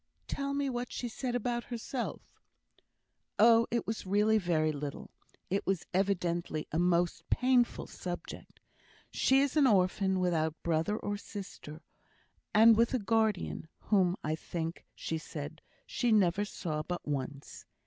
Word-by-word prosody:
"Tell 280 0 -2
me 285 0 0
what 245 -1 -3
she 245 - -3
said 245 +1 -3
about 240 0 -1
herself." 240 +1 -4 1.1
"Oh, 230 +1 +6
it 235 -1 -1
was 220 0 -3
really 210 +3 +3
very 160 -4 +1
little; 145 -1 -6 0.4
it 195 - +1
was 190 -3 0
evidently 175 -4 0
a 160 - 0
most 175 0 +1
painful 250 -1 +2
subject. 175 -1 -7 0.5
She 265 +1 +3
is 280 0 0
an 290 -3 +5
orphan, 190 -2 +2
without 160 -3 +1
brother 170 +5 +1
or 205 -1 -3
sister, 185 -6 -9 0.7
and 225 +2 +7
with 230 +3 +3
a - - +3
guardian, 215 -6 0
whom, 185 -3 +2
I 155 - 0
think 165 +1 -4
she 160 - -3
said, 155 +1 -7 0.2
she 245 -2 0
never 205 -1 +3
saw 155 -6 -3
but 175 +2 -5
once. 140 0 -4
195 Hz, 140 wpm, -31 LUFS, 165-230 Hz, 1.1 s, and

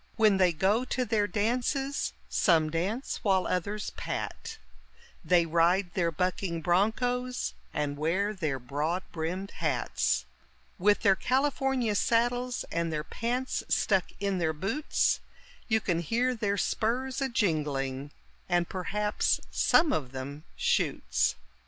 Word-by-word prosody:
When 215 -3 +4
they 185 -2 +4
go 195 +9 +2
to 255 0 -1
their 210 -2 +1
dances, 250 +6 -1
some 160 -5 +3
dance 195 - -2
while 190 -3 +2
others 205 +4 -2
pat - - -5 0.7
They 170 +1 +4
ride 175 +3 +2
their 170 -2 +1
bucking 180 0 -2
bronchos, 245 +8 +1 0.2
and 145 -1 -2
wear 190 +7 +1
their 155 -9 -2
broad 150 +8 -2
brimmed 175 +4 -3
hats; 60 - 0 0.5
With 205 +3 +3
their 195 -3 +5
California 265 -2 +1
saddles, 245 +3 +1
and 170 0 -1
their 150 -1 -2
pants 245 +8 -2
stuck 195 -3 +2
in 200 -2 0
their 160 -2 +1
boots, 200 - 0 0.5
You 220 -1 +3
can 175 -5 0
hear 235 +9 +1
their 205 -4 -1
spurs 255 +6 -1
a 270 - +1
jingling, 145 - -1 0.4
and 175 -1 +2
perhaps 210 +3 0
some 310 -4 +4
of 135 - -2
them 140 +3 -6
shoots. - - +1
195 Hz, 125 wpm, -29 LUFS, 165-230 Hz, 0.7 s, their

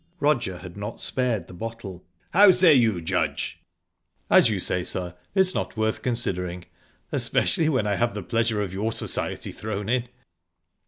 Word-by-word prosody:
Roger 130 - +1
had 90 -1 -10
not 105 +2 -6
spared 120 -8 -1
the - - -12
bottle. 100 -2 -7 0.3
"How 200 +3 +8
say 180 -3 +6
you, 115 -9 +3
Judge?" 90 +2 -2 0.7
"As - - +6
you 105 -3 -1
say, 90 0 0
sir, 90 0 -3 0.2
it's 190 -1 +3
not - - -3
worth 110 0 0
considering 90 -7 -2 0.5
especially 160 -1 +2
when 130 -8 +1
I 100 -1 0
have 120 0 0
the - - -4
pleasure 115 -2 0
of 95 -3 -4
your 105 +4 -1
society - - -1
thrown 105 -1 -5
in." 125 0 0
110 Hz, 160 wpm, -25 LUFS, 95-125 Hz, 0.7 s, How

